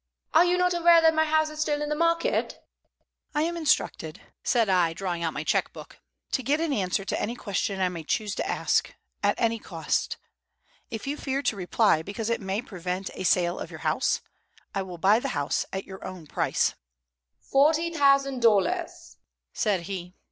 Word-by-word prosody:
"Are 325 +2 +7
you 355 0 +2
not 360 0 +2
aware 340 -1 +6
that 325 -1 +5
my 315 0 +3
house 315 0 +2
is 305 - -9
still 295 -1 0
in 295 0 -3
the 300 - 0
market?" 335 +1 +1 0.8
"I 300 - +2
am 340 +1 -1
instructed," 300 - 0 0.2
said 235 -3 +2
I, 180 -4 +3
drawing 175 -1 -3
out 165 -1 0
my 145 - -3
check - - +1
book, - - -12 0.3
"to 265 - 0
get 285 +4 +1
an 325 -3 0
answer 195 -3 -1
to - - -2
any 230 +3 -2
question 200 -3 -2
I 185 - +2
may 170 -2 -6
choose 205 +6 -1
to - - -3
ask, - - 0 0.3
at - - +2
any 230 -1 +1
cost. 165 -6 -2 0.7
If 225 - -6
you 285 +2 -3
fear 275 0 -2
to 220 - +1
reply 190 -2 +2
because 210 +6 -4
it 230 - -1
may 195 +4 -2
prevent 185 -3 -4
a - - -8
sale 175 -1 +2
of - - -6
your - - -10
house, - - +1 0.5
I 195 - -1
will 185 -2 -7
buy 200 +6 +4
the - - -3
house 145 0 -1
at 190 0 -4
your 190 0 -10
own 185 -4 -8
price." - - 0 0.7
"Forty 315 +5 +2
thousand 275 -3 +3
dollars," 235 - +1 0.4
said 205 -5 +1
he. 180 0 -6
225 Hz, 190 wpm, -26 LUFS, 185-300 Hz, 0.8 s, Are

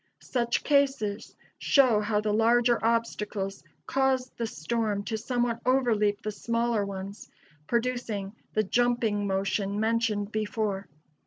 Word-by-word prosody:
Such 235 -2 0
cases 270 -8 +1 0.2
show 255 -6 +4
how 210 0 0
the 210 -1 0
larger 235 +2 +3
obstacles 210 -4 -1 0.2
cause 265 -1 +1
the 230 - -2
storm 210 +4 -2
to 220 - -3
somewhat 240 +1 -1
overleap 225 -5 +2
the 215 - -2
smaller 230 0 0
ones, 200 0 -7 0.4
producing 235 -5 -1 0.2
the 215 - +2
"jumping" 225 -2 +1
motion 195 +1 -1
mentioned 220 -2 0
before. 210 -3 -2
220 Hz, 115 wpm, -28 LUFS, 205-240 Hz, 0.4 s, show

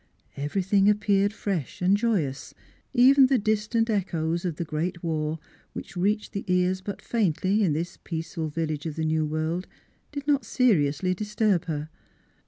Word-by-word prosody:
Every 145 +7 -2
thing 195 +1 +4
appeared 205 -1 +2
fresh 195 - -3
and 185 +2 +4
joyous; 200 - -1 0.4
even 265 +1 +6
the 265 0 +3
distant 215 +1 +1
echoes 170 -5 -1
of 170 -4 -1
the 170 - -4
great 165 +3 -3
war 155 -1 -1 0.4
which - - -8
reached 205 +4 0
the 200 - -3
ear 180 0 +2
but 200 -1 -6
faintly 200 -1 +1
in 170 -6 +2
this 170 +3 -4
peaceful 165 -1 -4
village 155 0 -3
of 155 - -5
the 160 - -2
new 155 0 +1
world 160 +4 -2 0.4
did 285 -1 -6
not 285 -3 +2
seriously 185 - +2
disturb 210 -2 0
her. 155 -2 -4
180 Hz, 160 wpm, -26 LUFS, 160-210 Hz, 0.4 s, even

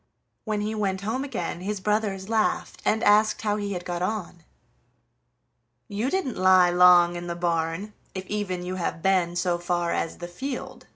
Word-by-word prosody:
When 215 -2 -1
he 215 +1 -2
went 195 -3 -1
home 225 +6 -2
again 175 -11 -4
his 205 +2 -3
brothers 200 -1 -1
laughed 220 -1 0
and 220 - +1
asked 215 +1 +4
how 210 -1 +1
he 205 -1 -3
had 180 -1 -5
got 175 -1 -3
on. 185 -3 -3 1.5
"You 210 +6 -2
didn't 370 -9 -2
lie 185 -1 +5
long 175 -1 +6
in 175 0 -5
the 170 - -3
barn, 170 +3 -2 0.2
if 190 0 -5
even 185 -3 -3
you 185 +1 -4
have 165 -2 -3
been 185 -3 +2
so 175 0 0
far 175 0 -1
as 165 - -2
the 175 - -7
field!" 255 +10 -6
190 Hz, 175 wpm, -25 LUFS, 175-210 Hz, 1.5 s, long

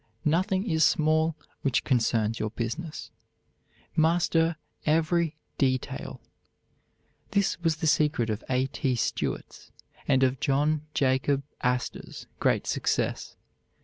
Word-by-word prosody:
Nothing 185 +6 +1
is 160 -4 +2
small 155 +1 +3 0.3
which 135 -3 +1
concerns 115 -3 +1
your 110 - -1
business. 125 +9 -5 0.8
Master 165 0 +3 0.3
every 165 +1 +2 0.2
detail. 130 -2 -1 1.1
This 200 -3 +1
was 165 -2 +2
the 165 +1 -4
secret 150 -7 +2
of 110 +1 -4
A. 130 0 +2
T. 135 -1 -1
Stewart's 120 - -3 0.4
and 135 -1 +4
of 130 0 +2
John 145 +2 +1
Jacob 135 +1 +2 0.2
Astor's 125 0 -2
great - - +2
success. - - -1
150 Hz, 110 wpm, -27 LUFS, 130-165 Hz, 1.1 s, and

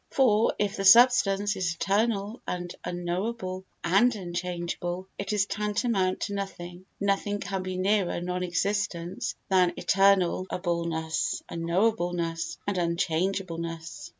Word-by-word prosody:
For, 230 -5 +3
if 205 0 -1
the 195 - -2
substance 205 -2 +6
is 180 -3 -1
eternal 205 +3 0
and 175 -1 -4
unknowable 185 +2 -3 0.2
and 205 +8 +4
unchangeable, 175 0 -4
it 200 0 -3
is 205 -2 +2
tantamount 210 -2 0
to 205 - -2
nothing. 185 -2 -6
Nothing 200 +1 0
can 195 -2 -3
be 185 0 -4
nearer 190 -1 +1
non 180 +1 -3
existence 180 0 -2
than 180 -2 +4
eternal 195 -2 +3
unknowableness 170 +1 -1
and 200 -2 0
unchangeableness. 170 -1 -2
185 Hz, 110 wpm, -27 LUFS, 175-200 Hz, 0.2 s, substance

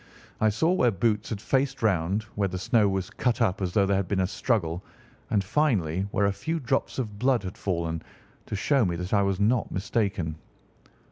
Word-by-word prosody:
I 110 - +4
saw 160 +11 +2
where 155 -10 +3
Boots 105 +1 0
had 110 - -3
faced 135 +3 0
round, 95 0 +1
where 100 -1 0
the 95 0 -4
snow 105 +2 +3
was 95 -1 -2
cut 125 -2 0
up 105 -5 +1
as 90 -2 -1
though 100 -2 +4
there 100 0 +2
had 95 -2 -1
been 100 0 0
a - - +2
struggle, 90 -4 -1 0.5
and, 100 -3 +2
finally, 100 - +1
where 100 - +1
a 100 - +2
few 160 +10 -3
drops 135 -1 -1
of 105 -6 -4
blood 125 -2 +2
had 90 -1 -6
fallen, 85 -4 -2 0.5
to - - -3
show 135 +6 +2
me 90 -4 0
that 90 +3 -4
I 100 - +5
was 100 -1 0
not 110 +3 +2
mistaken. 95 -5 -1
100 Hz, 205 wpm, -27 LUFS, 95-115 Hz, 0.5 s, I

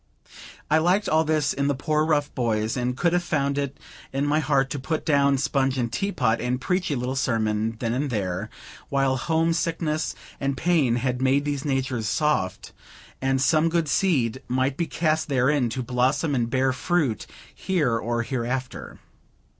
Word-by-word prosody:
I 155 +2 +4
liked 180 +6 +2
all 160 +1 +3
this 155 -2 +1
in 140 0 -1
the 145 - +1
poor, 155 +3 0
rough 150 -2 +1
boys, 110 -3 0
and 125 0 -2
could 170 +2 +2
have 175 - +3
found 140 -4 0
it 140 -1 -3 0.3
in 135 +2 -1
my 150 +2 +2
heart 135 -2 +1
to 145 - -3
put 155 +4 -3
down 140 -3 +3
sponge 135 0 0
and 120 -2 -2
tea 200 +5 -1
pot, 115 - +1
and 125 +1 -1
preach 180 +5 -1
a 145 - 0
little 125 +1 -2
sermon 110 -4 0
then 115 0 -2
and 140 +3 -1
there, 100 -2 -2 0.4
while 135 -1 +2
homesickness 165 +1 0 0.2
and 135 -1 -1
pain 155 -9 +2
had 125 +1 -1
made 135 +2 +2
these 145 -1 -2
natures 130 -6 -1
soft, 150 -12 0 0.5
that 135 0 +1
some 155 +3 +3
good 165 -1 0
seed 130 - +1
might 130 +2 0
be 170 +3 -1
cast 155 -1 0
therein, 130 -1 +2
to 125 +3 -3
blossom 130 +5 +1
and 120 -3 0
bear 130 +1 +1
fruit 150 -5 0 0.3
here 160 -11 0
or 115 +1 -1
hereafter. 125 +1 -4
135 Hz, 175 wpm, -24 LUFS, 125-155 Hz, 0.5 s, I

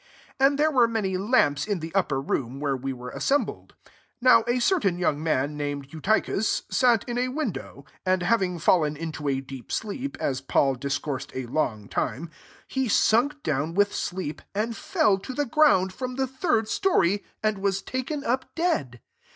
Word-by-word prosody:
8 270 - +5
And 280 0 0
there 310 +1 +3
were 250 -5 +5
py 205 -5 -1
lamps 185 - +2
in 205 -4 -1
the 160 0 -7
upper 175 -8 +1
room, 135 0 -3
re 140 -2 +1
we 135 +1 -3
were 125 -1 -7
assembled. 285 +1 -1 0.4
9 250 -2 +6
a 240 +1 +2
certain 245 - +2
young 155 -4 0
man, 150 -1 0
ed 145 -1 -4
Eutychus, 200 +5 0
sat 240 -4 +3
in 240 0 -2
a 250 - +1
win 260 - -2 0.5
and 185 -1 +1
having 185 -2 +1
fallen 155 -2 +2
into 155 -2 -4
a 135 0 -1
I 135 -2 -8
sleep, 255 +6 -3
as 130 -1 -1
Paul 135 0 +2
discoursed 140 +1 -3
png 120 -5 -2
time, 145 +8 -2 0.4
he 265 -1 -1
sunk 280 +8 +3
down 155 +4 -1
sleep, 175 -4 -4
and 225 +3 -1
fell 295 - +2
to 255 +6 -7
the 290 - 0 0.4
|nd 190 - -8
from 255 +5 -5
the 265 0 0
third 265 -3 0
story, 205 - +2 0.2
and 215 -2 +1
was 195 -1 0
taken 270 +3 -3
up 260 +1 -2
dead. 145 - -1
190 Hz, 170 wpm, -26 LUFS, -, 0.5 s, 9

